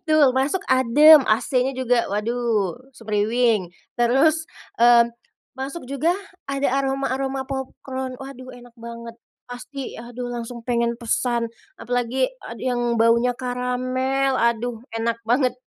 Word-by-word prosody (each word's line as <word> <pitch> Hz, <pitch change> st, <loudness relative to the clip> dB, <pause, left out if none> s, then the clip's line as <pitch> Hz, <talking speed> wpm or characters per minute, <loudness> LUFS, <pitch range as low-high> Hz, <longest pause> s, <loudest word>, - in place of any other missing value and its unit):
betul 310 Hz, -5 st, +4 dB
masuk 280 Hz, +8 st, +1 dB
adem 265 Hz, +4 st, +7 dB
AC-nya 250 Hz, +4 st, +1 dB
juga 250 Hz, -2 st, +1 dB
waduh 220 Hz, -2 st, -1 dB, 0.2 s
semriwing, 220 Hz, -3 st, 0 dB, 0.2 s
terus, 275 Hz, +7 st, +3 dB, 0.3 s
eee, 235 Hz, 0 st, +6 dB, 0.5 s
masuk 270 Hz, +4 st, -5 dB
juga 290 Hz, +5 st, +1 dB, 0.4 s
ada 275 Hz, 0 st, 0 dB
aroma-aroma 270 Hz, 0 st, -1 dB
popcron 265 Hz, -1 st, -5 dB
waduh 260 Hz, -1 st, -9 dB
enak 245 Hz, -1 st, -14 dB
banget, 235 Hz, 0 st, -9 dB, 0.3 s
pasti 255 Hz, +2 st, -7 dB
aduh 245 Hz, +1 st, -7 dB
langsung 235 Hz, 0 st, -6 dB
pengen 235 Hz, -1 st, +1 dB
pesan, 235 Hz, 0 st, 0 dB, 0.3 s
apalagi 245 Hz, +1 st, 0 dB, 0.2 s
ad -, -, -8 dB
yang 240 Hz, -2 st, 0 dB
baunya 235 Hz, +2 st, +4 dB
karamel 255 Hz, +2 st, -1 dB
aduh 235 Hz, 0 st, 0 dB, 0.2 s
enak 230 Hz, 0 st, -1 dB
banget. 250 Hz, +2 st, +2 dB
245 Hz, 115 wpm, -22 LUFS, 235-265 Hz, 0.5 s, adem